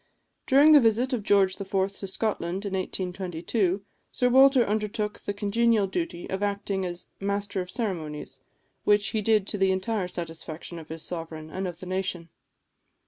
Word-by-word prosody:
During 285 +4 +7
the 300 - +9
visit 240 +2 +2
of 240 - 0
George 200 -1 +3
IV. 195 - -6
to 195 +1 -1
Scotland, 190 -2 -2
in 200 - -3
1822, 185 +1 -1 0.3
Sir 250 - +2
Walter 265 -1 +6
undertook 210 0 -2
the - - -4
congenial 210 +1 +2
duty 260 - -3
of 190 +1 -3
acting 200 -1 -1
as 175 0 -5
Master 200 0 -2
of 180 - -7
Ceremonies, 155 - -4 0.4
which 205 0 +3
he 220 - -1
did 215 -1 +3
to 205 - -3
the 190 0 +4
entire 190 +1 -1
satisfaction 165 -1 -6
of 160 - -12
his 160 0 -6
sovereign 160 -2 -6
and 190 +2 -3
of 175 -1 -7
the - - -7
nation. 185 -2 -3
195 Hz, 165 wpm, -27 LUFS, 180-215 Hz, 0.4 s, the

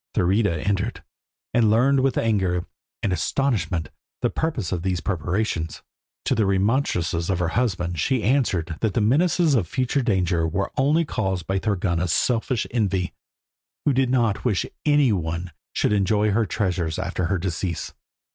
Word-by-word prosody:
Thurida 95 -3 +1
entered, 100 +3 -1 0.5
and 115 -3 +4
learned 130 +5 +4
with 130 -1 +1
anger 95 -6 +1 0.4
and 95 - +1
astonishment 90 - 0 0.3
the - - +2
purpose 145 - -2
of 90 -3 -1
these 90 -1 -1
preparations. 85 -1 -2 0.4
To - - +2
the 110 -3 +2
remonstrances 95 -4 +1
of 95 - +1
her 85 -1 0
husband 90 -7 -1
she 125 - +1
answered 95 - +1
that 110 -4 -1
the - - +3
menaces 160 +8 +3
of 110 -10 +2
future 130 - 0
danger 90 -7 +1
were 95 +5 -2
only 150 +5 +3
caused 95 - -2
by 95 0 0
Thorgunna's 90 -4 0
selfish 120 +3 +1
envy, 100 -6 0 0.7
who 145 - +3
did 130 0 +2
not 120 -5 +1
wish 110 -7 +1 0.2
any 145 -4 +4
one 85 -1 -2 0.2
should - - +1
enjoy 105 +1 +2
her 110 +1 +1
treasures 90 -6 -1
after 90 -1 -2
her 95 +2 0
decease. 85 -1 -3
100 Hz, 155 wpm, -23 LUFS, 90-120 Hz, 0.7 s, and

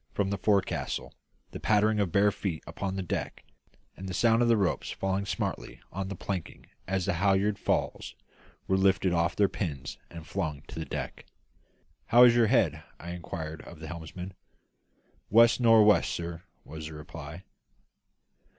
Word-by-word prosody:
from 100 -1 0
the 100 - -1
forecastle, 100 -2 0 0.4
the - - -7
pattering 105 0 +2
of 100 -4 0
bare 100 +3 +4
feet 90 -5 -4
upon 95 -1 -4
the 95 - -2
deck, 90 - -4 0.5
and 95 +1 -7
the 90 - -4
sound 115 +2 +4
of 120 - +3
ropes 105 -6 +1
falling 95 +1 -2
smartly - - -3
on 95 +1 -4
the 100 - -5
planking 90 -1 -5 0.2
as 95 -1 0
the 100 - +1
halliard 100 +3 +2
falls - - -1 0.5
were 95 - +2
lifted 95 -1 +3
off 85 0 +1
their 100 - +4
pins 70 -9 -5
and 85 -2 -10
flung 75 -1 -3
to - - -9
the 80 - -3
deck. - - -6 0.8
"How 120 +2 +7
is 120 -1 +8
her 120 -1 +4
head?" 80 - +2 0.2
I 85 - -7
inquired 80 -2 -6
of 85 - -12
the 80 - -8
helmsman. 90 +2 -7 1.0
"West 115 +2 +6
nor' 115 -3 +6
west, 105 -1 +4
sir," 85 0 -5 0.2
was 80 0 -7
the 80 - -9
reply. 75 +3 -9
95 Hz, 165 wpm, -29 LUFS, 85-105 Hz, 1.0 s, is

